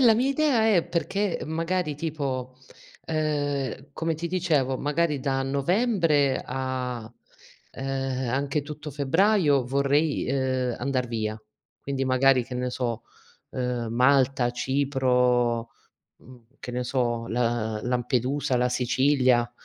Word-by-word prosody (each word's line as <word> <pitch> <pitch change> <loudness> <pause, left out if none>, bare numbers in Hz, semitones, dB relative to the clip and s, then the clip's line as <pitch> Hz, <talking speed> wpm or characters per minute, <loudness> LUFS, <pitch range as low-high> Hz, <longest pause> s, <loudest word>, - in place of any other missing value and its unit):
la 235 -4 +6
mia 250 +4 +1
idea 275 -6 +2
è 170 - +2
perché, 195 +3 -1
magari, 165 -1 -2
tipo, 140 -5 -3 0.5
ehm, 145 -4 -2
come 165 +3 -2
ti 170 +2 -4
dicevo, 155 -8 +1
magari 150 +1 0
da 135 0 -1
Novembre 150 - +2
a, 125 -3 -4 0.6
ehm, 135 -1 -3
anche 140 +3 -1
tutto 150 0 -8
Febbraio 150 - +3
vorrei, 140 +4 +1
ehm, 130 -2 0
andar 130 -1 -1
via. 110 -2 -2 0.4
Quindi 135 -1 -2
magari, 130 -1 +3
che 125 - -8
ne 125 0 -2
so, 120 -2 -3 0.5
uhm, 125 -2 -2
Malta, 130 +1 +3
Cipro, 125 -3 +1 0.5
mhmm, 125 -2 -16 0.2
che 125 - -6
ne 125 0 -2
so, 120 -2 -1
La 115 -2 -1
Lampedusa, 125 +2 0
la 125 0 +2
Sicilia. 125 -1 +2
135 Hz, 120 wpm, -26 LUFS, 125-150 Hz, 0.6 s, la